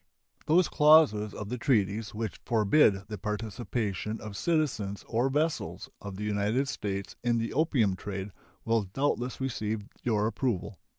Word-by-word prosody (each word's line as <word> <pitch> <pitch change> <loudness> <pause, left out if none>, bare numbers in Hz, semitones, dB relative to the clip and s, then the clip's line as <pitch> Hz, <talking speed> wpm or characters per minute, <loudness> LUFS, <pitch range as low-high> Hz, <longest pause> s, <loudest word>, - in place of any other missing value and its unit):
Those 175 +4 +5
clauses 150 -9 +5
of 105 - -7
the 125 +1 -3
treaties 105 -5 +1
which 110 -3 -4
forbid 110 -2 +3
the 105 -2 -6
participation 105 0 -3
of 105 -2 -8
citizens 125 -11 -1
or 120 +3 +1
vessels 150 +3 -1
of 100 -2 -7
the 105 - -5
United 105 +6 0
States 100 -6 -4
in 120 -1 +2
the 115 0 -2
opium 130 - +2
trade 95 +1 -5 0.3
will 115 0 +2
doubtless 125 +4 -2
receive 110 -5 -2 0.2
your 105 -3 +1
approval. 110 -4 -2
110 Hz, 140 wpm, -29 LUFS, 105-130 Hz, 0.3 s, Those